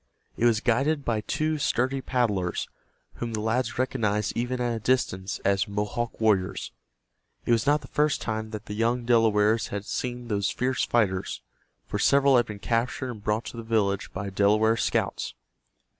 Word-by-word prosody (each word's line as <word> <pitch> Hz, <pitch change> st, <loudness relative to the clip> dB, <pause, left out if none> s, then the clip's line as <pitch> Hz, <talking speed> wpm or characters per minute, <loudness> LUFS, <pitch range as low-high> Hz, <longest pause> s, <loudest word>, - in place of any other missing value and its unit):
It 120 Hz, -, 0 dB
was 115 Hz, -2 st, +3 dB
guided 140 Hz, +5 st, +1 dB
by 110 Hz, -2 st, 0 dB
two 155 Hz, +7 st, -1 dB
sturdy 135 Hz, -1 st, 0 dB
paddlers, 105 Hz, -10 st, 0 dB, 0.5 s
whom 120 Hz, -1 st, -4 dB
the 110 Hz, -, -1 dB
lads 115 Hz, +4 st, -1 dB
recognized 110 Hz, -5 st, 0 dB
even 125 Hz, +2 st, -1 dB
at 120 Hz, -1 st, 0 dB
a -, -, -3 dB
distance 100 Hz, -6 st, 0 dB
as 100 Hz, 0 st, +2 dB
Mohawk 105 Hz, +4 st, -3 dB
warriors. 105 Hz, -4 st, +1 dB, 0.7 s
It -, -, 0 dB
was 115 Hz, +3 st, +2 dB
not 150 Hz, +1 st, +4 dB
the -, -, -11 dB
first 150 Hz, -1 st, +1 dB
time 110 Hz, 0 st, -3 dB
that 110 Hz, 0 st, -7 dB
the 105 Hz, -, -6 dB
young 115 Hz, +3 st, 0 dB
Delawares 110 Hz, -2 st, +3 dB
had 100 Hz, 0 st, -5 dB
seen 125 Hz, 0 st, -4 dB
those 100 Hz, -3 st, 0 dB
fierce 130 Hz, +1 st, 0 dB
fighters, 95 Hz, -6 st, 0 dB, 0.4 s
for -, -, -3 dB
several 140 Hz, -1 st, +5 dB
had 120 Hz, -, +2 dB
been 105 Hz, -, -6 dB
captured 120 Hz, +4 st, -1 dB
and 105 Hz, -4 st, -10 dB
brought 105 Hz, +2 st, 0 dB
to -, -, -7 dB
the -, -, -4 dB
village 105 Hz, -4 st, 0 dB
by 100 Hz, +1 st, -5 dB
Delaware 105 Hz, +3 st, +3 dB
scouts. -, -, -1 dB
115 Hz, 175 wpm, -26 LUFS, 105-125 Hz, 0.7 s, several